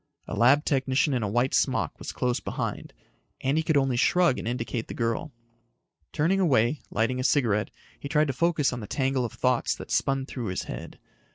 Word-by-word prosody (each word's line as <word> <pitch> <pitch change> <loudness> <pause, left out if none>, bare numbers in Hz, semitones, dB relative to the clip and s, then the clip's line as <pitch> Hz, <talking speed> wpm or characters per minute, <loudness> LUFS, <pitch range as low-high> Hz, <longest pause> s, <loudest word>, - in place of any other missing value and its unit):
A - - -6
lab 140 +6 +4
technician 135 +1 +1
in 125 - 0
a 105 - -1
white 120 +6 +1
smock - - 0
was - - -5
close 125 0 -1
behind. - - -4 0.5
Andy 140 +4 +1
could 160 -2 +1
only 135 -3 +1
shrug 175 +1 +3
and - - -5
indicate 115 -1 -3
the - - -7
girl. 115 +7 -2 0.8
Turning 175 +6 +1
away, 140 - +2
lighting 115 +4 0
a - - -1
cigarette, 115 -7 +2 0.3
he 140 - -7
tried 150 0 +3
to 135 - -2
focus 155 -2 +1
on 125 - -4
the 105 - -7
tangle 130 0 0
of 115 - -6
thoughts 125 -2 +1
that - - -10
spun 135 -1 +1
through 125 -4 -5
his 90 0 -2
head. - - -8
130 Hz, 195 wpm, -26 LUFS, 120-145 Hz, 0.8 s, lab